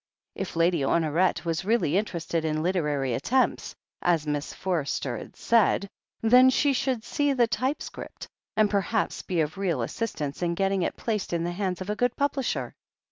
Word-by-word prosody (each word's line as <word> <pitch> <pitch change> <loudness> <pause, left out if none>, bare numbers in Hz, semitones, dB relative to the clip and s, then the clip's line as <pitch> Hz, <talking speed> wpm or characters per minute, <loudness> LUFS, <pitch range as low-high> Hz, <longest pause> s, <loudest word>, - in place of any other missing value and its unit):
If 195 - -5
Lady 170 0 +3
Honoret 165 +6 +1
was 165 +1 -1
really 205 -6 +1
interested 170 -5 -1
in 155 -1 -1
literary 150 -8 0
attempts, 250 - 0 0.3
as 165 -3 +2
Miss 150 0 -2
Forster 150 -8 -2
had - - -9
said, 215 -3 +2 0.4
then 250 +3 +7
she 280 +2 +3
should 255 -3 -1
see 290 +2 0
the 245 -3 +4
typescript, 260 +5 -4 0.3
and 215 -1 +5
perhaps 205 +2 0
be 175 -3 -1
of 155 +4 -3
real 170 -11 0
assist 230 - -4
ance 145 +1 -4
in 170 -1 0
getting 195 +1 +1
it - - -2
placed 215 -6 -2
in 170 -1 0
the 175 - -1
hands 185 0 -2
of 185 - -5
a - - -1
good 245 +2 +1
publisher. 280 -2 -1
185 Hz, 175 wpm, -27 LUFS, 160-230 Hz, 0.4 s, then